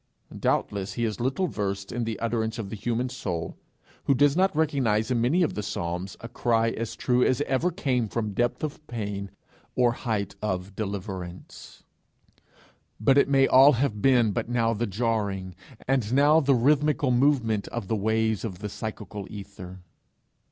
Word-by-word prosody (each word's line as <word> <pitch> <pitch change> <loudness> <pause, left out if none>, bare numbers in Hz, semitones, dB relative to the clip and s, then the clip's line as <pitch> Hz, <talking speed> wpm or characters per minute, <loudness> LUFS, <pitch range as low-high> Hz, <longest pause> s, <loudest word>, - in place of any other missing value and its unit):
Doubtless 100 -1 -1
he 120 - -1
is 110 0 -3
little 135 +10 0
versed 100 - -3
in 120 0 -2
the 115 -1 -3
utterance 115 -1 -1
of 100 -4 -5
the - - -4
human 120 +4 -1
soul, 90 -10 -4 0.5
who 140 - +3
does 145 +2 +4
not 190 -1 +2
recognize 130 -8 +1
in 120 -2 +1
many 155 +10 +3
of 160 - 0
the 105 - -3
psalms 90 -2 -4
a 115 - -6
cry 115 -1 +1
as 115 -1 -4
true 125 -1 +2
as 130 - +2
ever 145 +5 +1
came 135 - -1
from 110 -2 -2
depth 120 +7 0
of 155 0 -5
pain 100 -4 -4 0.5
or 125 -1 +4
height 110 -4 -3
of 95 -1 -3
deliverance; 95 -4 -6 1.2
but 120 +5 +4
it 140 - +4
may 135 -1 +5
all 135 +3 +7
have 115 -4 -1
been 120 -4 +4
but 110 - -3
now 115 -2 +1
the 115 +2 -2
jarring 100 -3 -1 0.3
and 125 -5 +1
now 145 +4 +5
the 140 -3 +3
rhythmical 145 +2 +2
movement 120 -5 +2
of 95 - -5
the 110 - 0
waves 110 0 0
of 100 -6 -4
the 105 +3 -5
psychical 105 -1 -6
aether! 95 -3 -9
115 Hz, 170 wpm, -26 LUFS, 100-130 Hz, 1.2 s, all